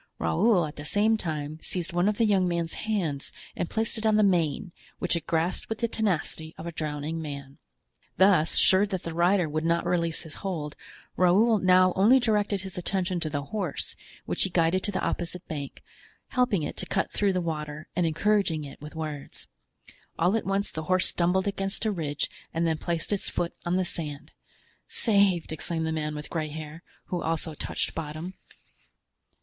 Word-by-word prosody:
Raoul 210 -7 +3
at 150 - -8
the 145 - -6
same 205 +8 +3
time 155 -5 -3
seized 180 0 -3
one 175 +3 +3
of 210 - -1
the 230 - +4
young 195 -4 +3
man's 170 -1 -1 0.2
hands 165 -10 -1 0.2
and 175 - -2
placed 220 0 0
it 220 - -5
on 215 - +4
the 215 - +5
mane, 175 -2 +2 0.3
which 180 - 0
it 165 -2 -4
grasped 165 +2 0
with 225 - -2
the 235 - 0
tenacity 175 -7 -2
of 160 - -7
a 170 - -3
drowning 155 0 -3
man. 140 -3 -7 0.6
Thus, 190 -4 +5
sure 190 +2 +5
that 190 -3 -3
the 165 - -4
rider 175 +1 +3
would 155 +1 -2
not 170 +1 +1
release 170 -2 0
his 160 -2 -8
hold, 160 -7 -3 0.4
Raoul 205 +5 +5
now 185 0 +5
only 220 +8 +6
directed 210 -4 +1
his 190 -2 -6
attention 185 0 -1
to 160 -2 -2
the 145 -1 -2
horse, 185 -2 -3 0.3
which - - 0
he 190 - +5
guided 170 +1 +2
to 205 - -1
the 190 - -1
opposite 180 +1 -2
bank, 145 -3 -6 0.5
helping 245 - +2
it - - -4
to - - -4
cut 190 - 0
through 200 -2 +2
the 185 - +1
water 155 -2 -4
and 175 -1 +2
encouraging 170 -1 +2
it 140 0 -10
with 150 +2 -9
words. 155 -3 -6 0.7
All 180 +5 +3
at 225 - -1
once 195 +1 0
the 160 0 -5
horse 185 +1 +4
stumbled 180 +3 +1
against 195 +2 -2
a 215 - +2
ridge 155 -6 -2 0.3
and 165 +1 +2
then 160 -1 +1
placed 170 +3 -2
its 200 - -2
foot 170 - -2
on 175 - +2
the 185 0 +2
sand. 150 -4 -5 0.6
"Saved!" 200 -7 +2
exclaimed 160 +1 -2
the 160 - -1
man 150 -1 -2
with 150 0 -7
gray 155 -2 -1
hair, 155 +1 -7 0.3
who 175 -2 -1
also 160 0 -1
touched - - -3
bottom. 160 +3 -5
175 Hz, 190 wpm, -27 LUFS, 155-195 Hz, 0.7 s, only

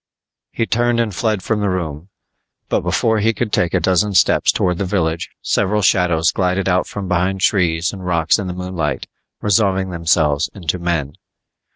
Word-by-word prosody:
He 115 - -1
turned 120 +1 +1
and 115 -3 0
fled 105 0 -1
from 110 -2 -1
the 100 -1 0
room, 85 -2 -4 0.6
but - - +1
before 110 -1 +1
he 110 +2 +2
could 110 0 -3
take 85 - +1
a - - +3
dozen 95 +3 +1
steps - - +4
towards 90 -2 -1
the - - 0
village, 85 -3 -1
several 105 +2 +1
shadows 85 -4 +3
glided 90 0 0
out 90 -1 +1
from 100 -2 -6
behind 90 +2 0
trees 85 -4 +1
and 95 -2 -8
rocks 85 +1 +1
in 100 - -4
the 90 - -4
moonlight, 90 -1 -3 0.4
resolving 95 -2 +1
themselves 80 -3 +1
into 90 -2 -3
men. 80 -5 -2
90 Hz, 175 wpm, -18 LUFS, 85-100 Hz, 0.6 s, steps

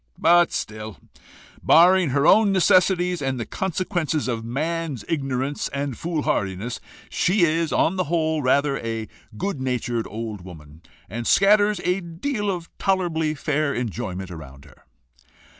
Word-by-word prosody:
But 175 +1 +4
still, 110 -3 -5 0.6
barring 180 0 +5
her 140 +2 +1
own 215 +2 +5
necessities, 180 -1 +3
and 135 -2 -2
the 115 - -3
consequences 175 - -2
of 115 -3 -2
man's 155 +3 -3
ignorance 135 -3 -2
and 140 -2 -4
foolhardiness, 115 - -2 0.3
she 185 +1 +1
is 165 0 +1
on 180 +4 +1
the 185 - 0
whole 160 -1 0
rather 140 +1 +2
a 115 -1 -4 0.3
good 195 - -3
natured 120 -3 -2
old 110 -2 -6
woman, 80 -4 -13 0.3
and 115 +4 -5
scatters 205 0 +4
a 180 +2 +1
deal 205 +6 -3
of 175 -3 -5
tolerably 165 -5 0
fair 145 0 -1
enjoyment 100 -6 -4
around 70 -4 -11
her." 70 - -21
150 Hz, 135 wpm, -23 LUFS, 115-175 Hz, 0.6 s, barring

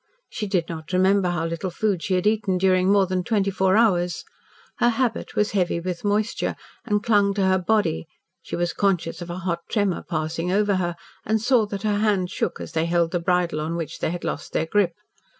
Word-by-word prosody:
She 210 - -3
did 180 -4 0
not 160 +1 -7
remember 190 0 +3
how 175 -2 -1
little 170 +3 -3
food 190 0 -1
she 185 - 0
had 180 - 0
eaten 210 -3 +2
during 185 0 +3
more 200 -1 +5
than 185 0 -1
twenty 200 -2 +1
four 190 +1 +2
hours. 180 -6 +2 0.6
Her 240 - +4
habit 240 -1 -1
was 210 0 +1
heavy 180 -4 +1
with 175 0 -4
moisture, 210 +2 0 0.3
and 210 -3 0
clung 205 -3 +3
to 195 -2 +1
her 190 0 +3
body; 185 - 0 0.3
she - - -6
was 175 0 -1
conscious 185 -4 0
of 175 - -7
a 175 - -4
hot 175 -2 -2
tremor 205 -5 0
passing 165 +1 -2
over 205 0 +2
her, 175 -2 -1 0.3
and 220 +1 +1
saw 225 -1 +3
that 200 0 -5
her 210 -1 +1
hands 200 -4 +1
shook - - -2
as - - -7
they 160 0 0
held 170 -1 +1
the 175 - 0
bridle 175 -2 0
on 160 +2 -2
which 165 -4 -5
they - - 0
had 175 +1 -5
lost - - -4
their 160 - +1
grip. 180 0 +1
185 Hz, 215 wpm, -24 LUFS, 175-205 Hz, 0.6 s, more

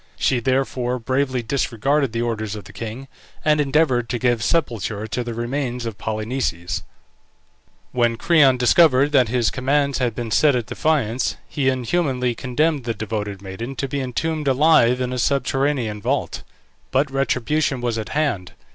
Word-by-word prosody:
She 130 - +1
therefore 130 0 0
bravely 130 +1 -1
disregarded 135 +2 0
the 115 +1 -1
orders 110 -3 -3
of 105 - -8
the - - -14
king, 115 +4 -6 0.4
and 150 -1 +4
endeavoured 135 -4 +2
to 120 - -1
give 120 -1 +1
sepulture 115 - -1
to 110 +3 -3
the 120 -1 -5
remains 120 0 -3
of 115 -3 -6
Polynices. 110 -5 -2 1.1
When 120 -2 +1
Creon 140 -3 +4
discovered 140 +2 +4
that 130 -5 +4
his 120 -2 +1
commands 140 +1 0
had 120 -4 0
been 115 -1 -4
set 145 +4 +4
at 120 -3 -1
defiance, 130 -6 0
he 135 -3 0
inhumanly 130 -1 0
condemned 140 +3 0
the 115 -1 -2
devoted 105 -2 -4
maiden 115 +8 -6
to 135 - -2
be 140 +1 -3
entombed 150 +4 -2
alive 130 -3 +4
in 125 0 -2
a 125 - -2
subterranean 135 -4 0
vault. - - -1 0.5
But 135 +1 +1
retribution 135 +1 0
was 120 -2 -1
at 110 - -5
hand. 140 - -1
125 Hz, 155 wpm, -21 LUFS, 115-140 Hz, 1.1 s, and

